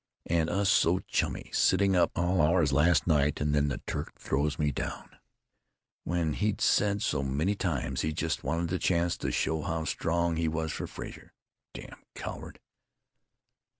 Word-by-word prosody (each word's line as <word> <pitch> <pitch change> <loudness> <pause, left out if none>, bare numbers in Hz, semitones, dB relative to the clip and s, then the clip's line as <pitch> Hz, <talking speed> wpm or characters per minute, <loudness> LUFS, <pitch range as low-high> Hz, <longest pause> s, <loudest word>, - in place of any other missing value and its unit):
And 80 -1 +1
us 100 +2 +1
so 90 -3 +4
chummy, - - -2
sitting 100 -1 +3
up 90 -1 +4
all 90 +1 +2
hours 80 -2 +3
last 75 +1 +4
night. 75 -3 +2
And 75 0 0
then 75 0 +2
the 70 - -4
Turk - - -5
throws 70 +2 -1
me 75 -1 +1
down.... - - -6 0.9
When 85 -2 0
he'd 105 +4 -1
said 105 0 +2
so 75 - 0
many 70 +9 0
times 70 -9 -2
he 80 - -1
just 80 0 -2
wanted 85 0 -1
the 90 - 0
chance 85 -1 +1
to - - -3
show 80 -1 0
how 80 0 -2
strong 85 +1 0
he 80 0 0
was 80 0 -2
for - - -4
Frazer.... - - -9 0.4
Damn - - -10
coward! - - -7
80 Hz, 165 wpm, -29 LUFS, 75-90 Hz, 0.9 s, so